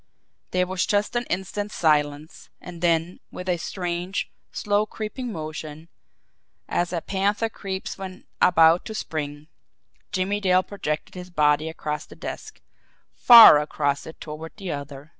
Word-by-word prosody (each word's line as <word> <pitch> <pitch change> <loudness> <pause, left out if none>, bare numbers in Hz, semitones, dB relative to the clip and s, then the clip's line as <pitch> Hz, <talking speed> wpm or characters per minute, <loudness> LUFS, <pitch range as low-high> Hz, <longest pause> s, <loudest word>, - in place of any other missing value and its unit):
There 180 0 +1
was 185 -1 -1
just 205 +3 0
an 240 0 0
instant's 205 +3 -4
silence; 150 -1 0
and 175 -2 -10
then, 170 0 +1
with 180 - -8
a 180 -1 +1
strange, 175 +1 -4 0.2
slow, 205 +1 0
creeping 225 +4 -5
motion, 155 -1 -7 0.8
as 175 0 -1
a 170 -2 -2
panther 200 +5 0
creeps 195 -2 -6
when 190 -1 -8 0.2
about 165 -1 +5
to 220 - -6
spring, 150 -6 -5 0.7
Jimmie 200 +1 -1
Dale 185 -1 +3
projected 155 -7 -4
his 180 0 -9
body 150 -1 +2
across 150 -1 -5
the - - -13
desk - - -8 0.5
far 230 -11 +10
across 145 -1 -2
it 160 - -11
toward 160 +1 -8
the 195 -4 -5
other. 140 0 -7
175 Hz, 140 wpm, -24 LUFS, 155-195 Hz, 0.8 s, far